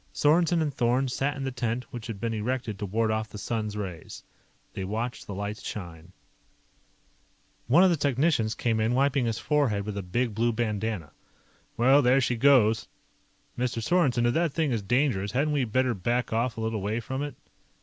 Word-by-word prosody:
Sorensen 165 +2 +3
and 145 -2 -2
Thorn 125 +2 +1
sat 145 +3 -1
in 135 - -4
the 135 - -2
tent 125 -1 -2
which 120 -2 -6
had 110 -4 -6
been 115 +1 -2
erected 115 -1 -3
to 105 - -3
ward 110 +3 0
off 110 0 -2
the 105 - -9
sun's 105 0 -3
rays. 90 -6 -7 0.5
They 95 - -4
watched 110 +5 -4
the 100 - -5
lights 105 +2 -4
shine. 85 -4 -8 1.6
One 160 +10 +6
of 190 - +5
the - - +3
technicians 140 -5 +1
came 115 -2 0
in, 110 +3 +1
wiping 135 -2 +2
his 115 -1 -1
forehead 130 -10 0
with 105 -1 -4
a 100 - -2
big 110 +6 -1
blue 115 +2 +1
bandana. 110 -7 -2 0.7
"Well, 135 +5 +5
there 130 +1 +4
she 125 -1 +1
goes. 115 -3 +4 0.7
Mr. 125 -1 -1
Sorensen, 125 -3 +2
if 120 - +2
that 165 -3 +1
thing 160 -4 0
is 115 -3 0
dangerous, 105 -3 0
hadn't 145 +4 +1
we 140 -3 +1
better 125 +2 +1
back 120 +5 -1
off 115 +1 0
a - - -3
little 110 -2 -2
way 105 +4 -1
from 130 +4 -4
it?" 145 -2 -4
120 Hz, 190 wpm, -27 LUFS, 110-135 Hz, 1.6 s, One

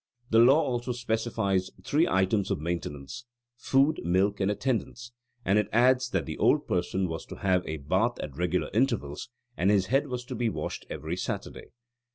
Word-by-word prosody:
The 115 - +5
law 130 +6 +7
also 120 0 -2
specifies 110 -5 -1
three 155 - +2
items 95 +2 +1
of - - -1
maintenance 85 - -5 0.3
food, 135 +5 +2
milk, 95 +4 +1
and 95 0 +1
attendance; 120 +2 -2 0.3
and 100 +2 +4
it 105 - -1
adds 125 +2 +3
that - - -1
the - - -6
old - - +3
person 90 +1 0
was 80 -1 -5
to - - -8
have 90 -2 +1
a 80 - -3
bath 95 - 0
at 70 -3 -6
regular 90 +3 -1
intervals, 115 - -1 0.3
and 90 +3 +1
his 100 -2 +3
head 140 +2 +3
was 125 -2 -5
to - - -6
be 120 -2 0
washed - - -5
every 80 +3 -4
Saturday. - - -5
105 Hz, 180 wpm, -28 LUFS, 90-120 Hz, 0.3 s, law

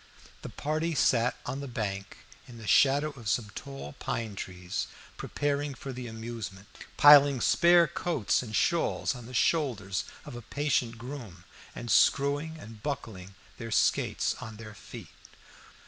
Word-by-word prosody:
The - - -7
party 155 +3 -2
sat 125 -3 +2
on 130 +2 -4
the 140 - -6
bank 100 -6 -4 0.3
in 120 - -12
the 110 - -10
shadow 140 +7 +4
of 120 -7 -6
some 105 -4 -1
tall 135 - -8
pine 110 -3 -3
trees, 90 -2 -5 0.3
preparing 145 -1 -2
for 135 +1 -7
the 125 -1 -6
amusement, 110 -4 -7 0.3
piling 145 -2 +8
spare 170 +6 +5
coats 165 - 0
and 110 -4 -6
shawls 170 +1 +1
on 120 -2 -10
the 125 - -8
shoulders 115 - 0 0.2
of - - -8
a 120 - -7
patient 120 -1 -1
groom, 115 -8 -9 0.3
and 120 -1 -5
screwing 145 +3 +3
and 110 -8 -12
buckling 100 -9 -5 0.2
their 115 -1 -6
skates 110 - +1
on 110 -1 -8
their 110 -1 -10
feet. - - -11
120 Hz, 145 wpm, -29 LUFS, 110-145 Hz, 0.3 s, piling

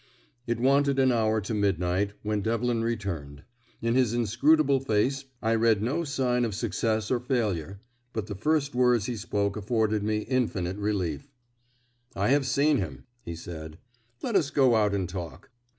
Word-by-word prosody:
It 120 -1 -1
wanted 140 +2 +3
an 130 -1 +4
hour 110 -2 +2
to 105 +3 -4
midnight 100 -1 0
when 105 -1 -1
Devlin 115 +2 0
returned. 85 -12 -4 0.4
In 115 0 +1
his 125 -3 +2
inscrutable 135 +6 +3
face 135 +3 0 0.2
I 110 +1 +2
read 110 -2 +3
no 140 +9 0
sign 130 -4 0
of 110 -4 -2
success 110 +2 -1
or 125 - +2
failure; 100 - -2 0.3
but 110 -4 -3
the 105 - -6
first 145 +7 0
words 125 -3 +3
he 125 - -3
spoke 100 -1 -1
afforded 110 0 0
me 105 +1 0
infinite 105 -7 -1
relief. 100 - -2 0.8
"I - - +1
have 140 0 +3
seen 145 +2 +3
him," 75 - -4 0.2
he 85 - -6
said. 80 -2 -8 0.5
"Let 235 - -2
us 160 -7 +3
go 135 -4 +4
out 105 -2 +2
and 95 -2 -1
talk. 90 +2 -8
110 Hz, 165 wpm, -27 LUFS, 100-130 Hz, 0.8 s, an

